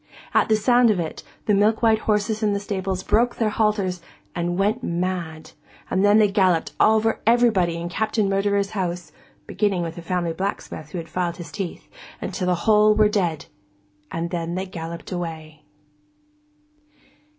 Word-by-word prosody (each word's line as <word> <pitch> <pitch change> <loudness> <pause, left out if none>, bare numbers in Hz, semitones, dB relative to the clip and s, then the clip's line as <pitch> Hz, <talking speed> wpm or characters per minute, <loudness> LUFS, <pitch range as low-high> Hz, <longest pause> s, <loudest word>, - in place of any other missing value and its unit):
At - - +3
the 220 - +5
sound 240 +3 +4
of 205 -4 +2
it, 165 -2 -4
all - - -26 0.2
the 210 - +2
milk 210 +3 +2
white 220 -1 +4
horses 215 0 0
in 210 -2 +2
the 200 - -1
stables 190 -2 -3
broke 240 +4 +2
their 220 -2 0
halters 205 -5 0 0.3
and 175 0 -2
went 210 +5 +1
mad, 170 -5 -3 0.4
and 190 - +2
then 205 +1 +5
they 215 -1 +5
galloped 185 -5 +2
over 220 +1 +3
everybody 225 -8 +3
in 170 +1 -4
Captain 215 +3 0
Murderer's 200 0 +1
house 180 -4 -3 0.3
(beginning 195 -4 0
with 165 -1 -4
the 170 - -9
family 170 -1 -2
blacksmith 185 -5 -5
who 180 - -6
had 165 -1 -6
filed 175 +1 -2
his 170 -4 -9
teeth) 180 +3 -6 0.3
until 185 -4 -3
the 180 - +3
whole 215 -1 +5
were 215 -1 +4
dead, 175 -7 -1 0.6
and 170 +1 -4
then 170 -1 -3
they 190 +1 -2
galloped 170 -2 -7
away. 160 -3 -6
190 Hz, 170 wpm, -23 LUFS, 170-215 Hz, 0.6 s, the